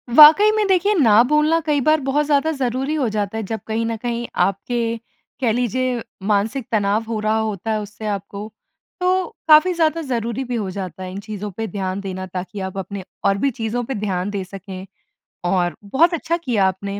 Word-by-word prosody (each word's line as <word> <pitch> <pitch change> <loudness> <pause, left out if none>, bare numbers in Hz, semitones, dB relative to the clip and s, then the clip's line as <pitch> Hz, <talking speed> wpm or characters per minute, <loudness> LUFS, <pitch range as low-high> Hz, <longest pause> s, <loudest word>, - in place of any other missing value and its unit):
वाक़ई 315 +9 +9
में 430 -1 +2
देखिए, 385 +2 +3
ना 230 - +6
बोलना 300 +2 +3
कई 300 -3 +1
बार 310 +4 +3
बहुत 275 +3 +1
ज़्यादा 295 +2 +2
ज़रूरी 265 0 -1
हो 280 -5 +1
जाता 210 0 -2
है 225 - -2
जब 220 +2 -4
कहीं 225 +1 -1
न 230 0 -1
कहीं 235 +1 -3
आपके, 230 +5 0 0.4
कह 240 -3 +2
लीजिए 250 +2 0 0.3
मानसिक 220 +5 0
तनाव 210 0 +1
हो 225 -1 -2
रहा 215 +1 +1
होता 220 -1 -2
है 215 - 0
उससे 210 +1 -9
आपको। 200 0 -4 0.5
तो 365 0 +2 0.2
काफ़ी 310 +4 +7
ज़्यादा 330 -1 +1
ज़रूरी 235 +1 -1
भी 250 -1 -4
हो 210 -5 -2
जाता 185 -1 -5
है 185 - -6
इन 190 - -6
चीज़ों 210 -1 -5
पे 225 0 -2
ध्यान 190 0 -2
देना 185 -1 -5
ताकि 185 +3 -6
आप 190 - -11
अपने 195 +1 -5 0.2
और 195 - +3
भी 275 +7 +1
चीज़ों 225 +2 -1
पे 265 - -4
ध्यान 185 -1 -1
दे 200 -2 -3
सकें। 190 0 -9 0.7
और 175 -4 +1
बहुत 300 - +3
अच्छा 335 +1 -1
किया 240 - +1
आपने। 195 +2 -3
225 Hz, 200 wpm, -21 LUFS, 200-280 Hz, 0.7 s, वाक़ई